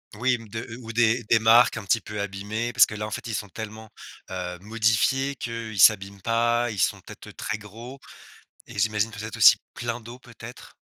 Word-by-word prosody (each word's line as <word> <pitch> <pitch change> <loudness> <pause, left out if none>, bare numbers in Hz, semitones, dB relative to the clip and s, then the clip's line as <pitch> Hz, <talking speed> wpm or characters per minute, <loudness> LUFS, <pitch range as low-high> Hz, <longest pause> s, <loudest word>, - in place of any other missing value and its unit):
Oui, 125 +4 +1
m 115 -2 -10
de 115 +2 -6 0.2
ou 115 -1 -8
des 120 +1 +2
des 115 +1 +3
marques 115 +2 +5
un 115 - -5
petit 100 +3 +2
peu 105 -2 -6
abîmées 105 +4 -4
parce - - +6
que 110 - -8
là, 105 0 -4
en 110 - -7
fait, - - -5
ils 110 - -3
sont 105 -2 -5
tellement, 110 +2 -8 0.4
heu, 90 -1 -5
modifiés 115 +6 +1
qu'ils 115 -4 -6
s'abîment 100 +2 +4
pas. 120 +2 +1
Ils 105 - -6
sont - - +1
peut-être - - -12
très 110 - -4
gros 115 +6 -11 0.7
et - - -7
j'imagine, 105 +1 +1
peut-être 110 0 -7
aussi, - - +8 0.2
plein 120 0 -4
d'eau, 115 +2 -11
peut-être? 120 -1 -12
110 Hz, 200 wpm, -25 LUFS, 105-120 Hz, 0.7 s, aussi